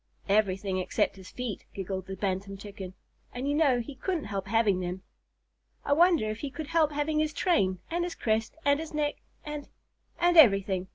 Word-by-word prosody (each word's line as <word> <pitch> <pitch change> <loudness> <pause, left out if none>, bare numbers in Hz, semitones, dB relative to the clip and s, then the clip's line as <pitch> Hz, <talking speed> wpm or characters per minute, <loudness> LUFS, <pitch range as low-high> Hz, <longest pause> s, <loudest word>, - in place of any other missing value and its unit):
"Everything 195 -2 +1
except 185 - 0
his 190 -1 -12
feet," 250 -5 -5
giggled 190 -1 -4
the 190 - -5
Bantam 195 +1 -3
Chicken, 195 -2 -8 0.4
"and 255 +3 -3
you 285 - +1
know 290 -5 +3
he 260 +5 -8
couldn't 325 +4 -2
help 200 -1 -4
having 215 -3 +2
them." 180 +1 -4 0.8
"I 285 - +3
wonder 335 -6 +4
if 215 - -6
he 285 - -4
could 300 +2 -7
help 325 -2 +3
having 295 +1 0
his 310 0 0
train, 200 - +2
and 345 +1 0
his 350 -1 -4
crest, 220 0 -1
and 285 0 +4
his 320 -1 -6
neck, 295 -1 0 0.3
and 295 -1 -6 0.5
and 350 0 +3
everything?" 195 - +5
230 Hz, 185 wpm, -29 LUFS, 195-300 Hz, 0.8 s, everything